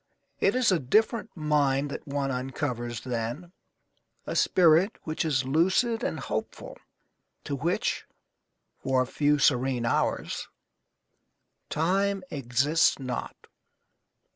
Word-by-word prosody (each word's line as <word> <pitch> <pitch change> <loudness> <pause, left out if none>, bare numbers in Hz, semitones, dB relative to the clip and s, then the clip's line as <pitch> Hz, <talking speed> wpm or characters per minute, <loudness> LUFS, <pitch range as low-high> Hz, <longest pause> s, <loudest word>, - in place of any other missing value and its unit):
It - - +2
is 255 -4 +3
a 180 - +3
different 215 - +1
mind 145 -2 +1
that - - -7
one 140 -1 -1
uncovers 125 -2 -3
then, 125 +8 -4 0.7
a - - -4
spirit 175 +4 +4
which 155 +1 -2
is 140 -5 0
lucid 190 - +2
and - - -2
hopeful, - - -5 0.6
to 145 - -3
which 165 +6 -1 0.7
(for 130 -1 +1
a - - -5
few 150 +3 +1
serene 130 -3 +2
hours) 115 - -1 1.2
time 195 +5 0
exists 140 +4 +2
not. 130 -2 -6
145 Hz, 110 wpm, -27 LUFS, 130-175 Hz, 1.2 s, spirit